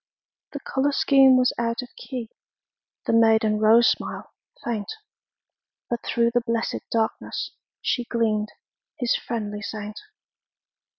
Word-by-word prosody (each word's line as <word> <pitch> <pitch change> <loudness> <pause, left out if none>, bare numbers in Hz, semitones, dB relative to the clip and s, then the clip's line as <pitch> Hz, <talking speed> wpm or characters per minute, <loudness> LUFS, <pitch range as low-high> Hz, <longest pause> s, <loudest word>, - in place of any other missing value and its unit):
The 285 - -4
color 270 +2 0
scheme 270 -2 +5
was 250 0 +3
out 235 +1 -1
of 250 - -14
key, 245 -4 -7 0.7
The - - 0
maiden 220 -1 +4
rose 225 +2 +6
smile - - -2 0.3
faint, 215 -4 -3 1.0
But 235 - -2
through 235 -1 +1
the 245 0 +2
blessed 230 -1 -2
darkness 225 -1 -2 0.3
She 245 - 0
gleamed, 215 -3 0 0.5
his 245 -5 +1
friendly 210 -3 -4
saint. 210 0 -6
230 Hz, 120 wpm, -24 LUFS, 220-245 Hz, 1.0 s, rose